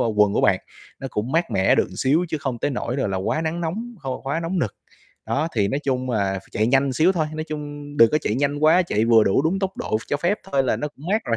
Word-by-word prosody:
vào 115 - +1
quần 105 -1 +3
của - - +2
bạn, - - +3 0.4
nó 135 - -4
cũng 115 +6 -3
mát 165 -3 +1
mẻ 95 -3 +3
được - - +1
xíu, 150 +7 +2
chứ 155 - -2
không 130 -4 -3
tới 145 - -1
nỗi 125 0 -3
rồi 130 - 0
là 95 - -2
quá 95 +11 -1
nắng 165 +2 -2
nóng, 220 +9 -4
khô 135 -3 -4
quá 140 +5 -1
nóng 170 +3 -2
nực. 110 - -1 0.5
Đó, 155 +4 0
thì 100 -3 +2
nói 140 - -1
chung 130 -2 -1
là 100 -4 0
phải 95 0 -7
chạy 110 - +1
nhanh 135 +1 +2
xíu 165 +9 +3
thôi, 160 -4 0
nói 155 - -3
chung 145 -1 -7
đừng 115 -3 +6
có 150 - +4
chạy 105 - -1
nhanh 145 +2 0
quá, 160 +4 +5
chạy 110 -11 0
vừa 115 -2 +5
đủ 95 - +2
đúng 170 +5 +1
tốc 195 -1 -3
độ - - -1
cho 145 - 0
phép 175 +7 0
thôi 135 -1 +3
là 130 - +1
nó 150 - -3
cũng 145 +2 -14
mát 220 - +1
rồi. 115 -2 0
140 Hz, 285 wpm, -23 LUFS, 115-160 Hz, 0.5 s, đừng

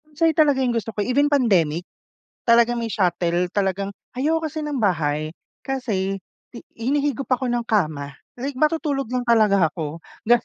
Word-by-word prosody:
Minsan 320 +2 +2
'yon - - -32
talaga 290 -4 +4
yung 245 - +1
gusto 230 -1 -2
ko. - - -5
Even 285 +3 +2
pandemic, 180 - +2 0.6
talagang 235 +1 +4
may 230 - -2
shuttle. 175 -3 0
Talagang 195 0 -1 0.3
ayaw 310 +5 +1
ko 320 - -2
kasi 310 - -7
ng 295 -2 -2
bahay 155 -5 0 0.3
kasi 215 -8 -2 0.4
hi - - -7 0.2
hinihigop 275 +2 -1
ako 255 -1 0
ng 240 -1 -1
kama. 150 - -1 0.2
Like 270 +2 -4
matutulog 300 -4 0
lang 250 -1 -1
talaga 210 -7 +4
ako, 160 -2 -5 0.3
gano'n. 240 +1 +4
235 Hz, 165 wpm, -22 LUFS, 185-275 Hz, 0.6 s, talaga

